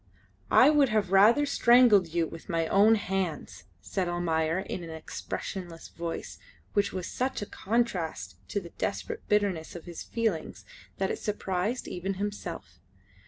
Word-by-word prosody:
"I - - +7
would 290 -3 +4
have 210 -4 0
rather 220 +9 +6
strangled 235 -8 +5
you 165 0 0
with 165 +4 -10
my 165 -2 +1
own 205 +6 +5
hands," 195 -5 -3 0.2
said 190 -3 -2
Almayer, 165 -1 0
in 180 - -5
an 165 - -8
expressionless 165 +2 -6
voice 170 0 -6 0.3
which 205 -2 +2
was 185 -2 -4
such 255 -1 -2
a - - -4
contrast 185 - -2
to 205 - -1
the 170 -3 -11
desperate 455 -1 -3
bitterness 200 -7 0
of 170 - -8
his 175 -2 -8
feelings 220 -9 -2 0.3
that 190 0 0
it - - -4
surprised 205 +2 -2
even 190 +2 -3
himself. 180 - -5
190 Hz, 150 wpm, -28 LUFS, 170-210 Hz, 0.3 s, I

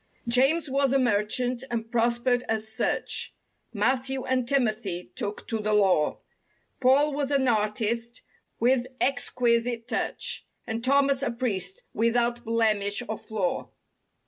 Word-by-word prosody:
James 270 +7 +3
was 275 0 +1
a - - +5
merchant 245 +1 +1
and 225 -1 -3
prospered 240 +1 +2
as 220 -1 -1
such; 220 - -1 0.2
* - - -47
Matthew 265 0 0
and 255 -2 0
Timothy 215 -9 -1
took 205 +1 -5
to 225 - -1
the 215 0 0
law; 190 -7 +3 0.6
Paul 280 +3 +4
was 280 -1 -1
an 275 -2 +2
artist 230 +2 -1 0.4
with 245 +1 +2
exquisite 240 -2 0
touch. - - -1 0.2
And 225 +1 -4
Thomas, 275 +1 +3
a 275 - 0
priest, 200 -7 -2
without 235 +1 +1
blemish 220 -2 +1
or 220 - -2
flaw. 205 -4 -3
235 Hz, 130 wpm, -27 LUFS, 220-260 Hz, 0.6 s, a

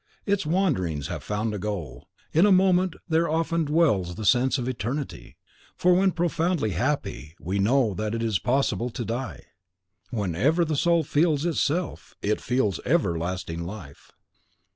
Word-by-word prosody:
Its 200 -5 0
wanderings 120 - 0
have - - -4
found 105 +1 -2
a 105 - -3
goal. 95 - -5 0.2
In 170 +6 +5
a - - +4
moment 185 -1 +4
there 165 0 +2
often 165 +1 0
dwells 140 - +2
the 110 - -5
sense 130 +3 +3
of 125 -2 -3
eternity; 125 - -4 0.4
for 180 +1 +3
when 190 +1 +3
profoundly 170 - 0
happy, 85 - -2
we 95 +6 -2
know 115 +1 +3
that 110 +3 -2
it 115 - -2
is 110 -5 +1
impossible 125 -2 0
to 120 0 -5
die. 120 +5 -4 0.7
Whenever 115 - +1
the 155 -1 -1
soul 170 +2 +3
FEELS 150 +1 +1
ITSELF, 170 +1 -1
it 105 +1 0
feels 125 -7 0
everlasting 85 0 -1
life. 85 -6 -10
130 Hz, 150 wpm, -25 LUFS, 100-165 Hz, 0.7 s, In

